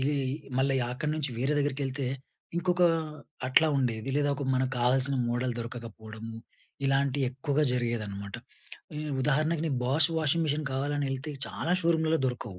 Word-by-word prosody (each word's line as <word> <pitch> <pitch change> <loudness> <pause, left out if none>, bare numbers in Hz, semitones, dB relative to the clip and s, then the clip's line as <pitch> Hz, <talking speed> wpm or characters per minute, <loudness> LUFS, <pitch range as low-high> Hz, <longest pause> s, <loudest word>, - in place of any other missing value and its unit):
ఇది 145 +2 +1 0.4
మళ్ళీ 135 0 +3 0.2
అక్కడి 150 +4 -2
నుంచి 150 -3 -1
వేరే 135 +4 +1
దగ్గరికేళ్తే 140 -1 -1 0.5
ఇంకొక 180 +1 +2 0.6
అట్లా 155 +5 +5
ఉండేది. 120 -2 -1
లేదా 145 0 +2
ఒక 140 - -4
మనకు 130 0 +1
కావాల్సిన 130 +3 +4
మోడల్ 120 +1 0
దొరకకపోవడమూ, 115 -1 -7 0.5
ఇలాంటివెక్కువగా 135 +1 +1
జరిగేదనమాట. 110 -5 -2 0.6
ఉ - - -5 0.3
ఉదాహరణకు 155 +3 +2
నేను 140 -5 0
బాష్ 145 +5 +4
వాషింగ్ 160 +2 +2
మిషన్ 150 +1 0
కావాలని 145 +2 0
ఎళ్తే 135 +3 -3 0.2
చాలా 170 - -2
షోరూంలలో 160 -1 +3
దొరకవు. 120 -6 -4
135 Hz, 135 wpm, -29 LUFS, 125-150 Hz, 0.6 s, అట్లా